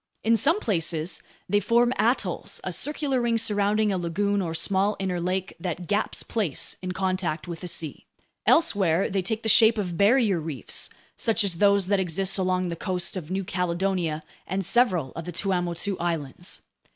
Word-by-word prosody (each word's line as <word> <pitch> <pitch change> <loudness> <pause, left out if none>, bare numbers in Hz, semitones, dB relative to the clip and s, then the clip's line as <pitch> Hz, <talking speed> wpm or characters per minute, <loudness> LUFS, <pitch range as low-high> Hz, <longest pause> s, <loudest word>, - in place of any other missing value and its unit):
In 230 +1 +4
some 280 - +3
places, 165 - -1 0.3
they 205 +2 +3
form 240 +3 +3
atolls, 235 +5 0
a - - -3
circular 285 -3 -1
ring 235 -1 +2
surrounding 210 -1 +2
a 190 - 0
lagoon 200 +4 0
or 165 -3 -3
small 195 +4 +1
inner 185 -2 -2
lake 185 +1 -2
that 175 0 -4
gaps 205 +5 0
place 200 - -1
in 185 0 -3
contact 185 -4 -2
with 170 -2 -6
the 180 - -6
sea. 165 -3 -4 0.4
Elsewhere, 195 - +3
they 195 0 +1
take 220 +4 -3
the - - -2
shape 220 +1 +6
of 180 -5 -3
barrier 210 -3 +4
reefs, 150 -7 -3 0.3
such 225 -1 +2
as 180 -4 -1
those 200 -2 +4
that 200 +1 +2
exist 190 +2 0
along 185 -1 0
the 170 - -3
coasts 180 0 -1
of 170 -4 -6
New 190 +1 -1
Caledonia 175 -3 -1 0.2
and 190 +1 -2
several 185 - +2
of 165 - -7
the 175 - -5
Tuamotu 180 +1 -1
Islands. 170 0 -4
190 Hz, 175 wpm, -26 LUFS, 175-210 Hz, 0.4 s, shape